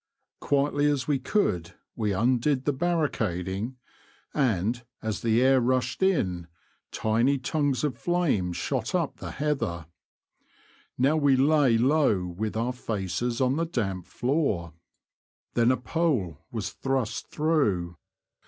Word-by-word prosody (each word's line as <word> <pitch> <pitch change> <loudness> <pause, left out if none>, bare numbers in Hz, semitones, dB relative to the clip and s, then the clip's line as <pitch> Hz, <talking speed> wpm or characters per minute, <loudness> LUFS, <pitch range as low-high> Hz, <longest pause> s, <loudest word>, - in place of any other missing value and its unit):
Quietly 145 +1 +1
as 140 -3 0
we 145 -3 +1
could 90 - 0 0.2
we 105 -3 -1
undid 125 +6 +1
the 145 - +2
barricading, 120 - -1 0.6
and, 120 - 0 0.2
as 110 -3 -3
the 115 +1 +3
air 130 0 +5
rushed 125 +3 0
in, 95 - +1 0.4
tiny 115 +6 +2
tongues 140 -1 0
of 135 -6 -1
flame 160 - +1
shot - - -2
up - - -1
the - - -7
heather. 135 - -2 1.1
Now 140 +5 +3
we 145 -3 +4
lay 135 -3 +4
low 125 -7 +3
with 105 +5 -4
our 120 +3 0
faces 115 0 -3
on 130 +2 +2
the 165 - +1
damp 95 - -3
floor. 120 - -1 0.8
Then 120 0 +3
a 130 - +1
pole 125 - -1
was 110 -4 -4
thrust 135 -4 -2
through. 105 - 0
125 Hz, 125 wpm, -27 LUFS, 105-145 Hz, 1.1 s, air